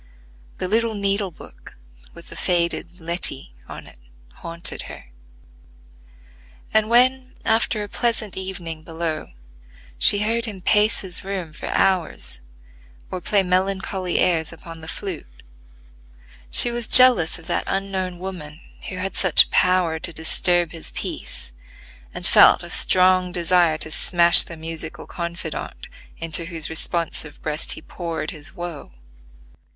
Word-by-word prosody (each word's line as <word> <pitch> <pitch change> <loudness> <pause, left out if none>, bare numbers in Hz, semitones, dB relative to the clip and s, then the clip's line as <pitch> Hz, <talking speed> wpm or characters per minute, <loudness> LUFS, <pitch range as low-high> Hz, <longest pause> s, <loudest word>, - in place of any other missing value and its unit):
The 185 - -3
little 225 +2 0
needle 200 0 -1
book 60 - -15 0.4
with 170 - -12
the - - -10
faded 175 0 -1
"Letty" 165 - -1 0.2
on - - -9
it 60 - -16 0.4
haunted 170 +1 -2
her; 60 - -12 1.6
and 220 0 +2
when, 255 +2 +2
after 220 -1 +1
a - - -7
pleasant 225 -2 -2
evening 175 -4 -6
below, 160 -1 -5 0.7
she 205 - +5
heard 230 +2 0
him 210 -4 -6
pace 210 +3 +2
his 185 -3 -2
room 185 -5 -5
for - - -8
hours, 180 - 0 0.7
or 185 - -5
play 200 +2 +2
melancholy 185 0 -1
airs 160 -3 +1
upon 165 0 -11
the 160 - -10
flute, 165 - -8 1.1
she 240 - +6
was 235 -1 -3
jealous 250 -12 +7
of 165 - -14
that - - -2
unknown 190 -2 -3
woman 175 -5 -8 0.3
who 185 - -6
had 185 +1 -4
such 185 -5 +4
power 180 -3 +2
to 170 - -2
disturb 170 +1 +1
his 165 -2 -4
peace, - - -6 0.6
and - - -6
felt - - +6
a - - -5
strong 185 0 +4
desire 175 -2 +2
to 155 - -2
smash 170 +1 +6
the 170 - -2
musical 160 0 -6
confidante 170 -1 -7 0.3
into 165 0 -1
whose 165 -2 -3
responsive 160 -2 -1
breast 155 0 -2
he - - -11
poured 165 -3 -5
his 150 0 -9
woe. 175 - -8
175 Hz, 135 wpm, -21 LUFS, 165-195 Hz, 1.6 s, jealous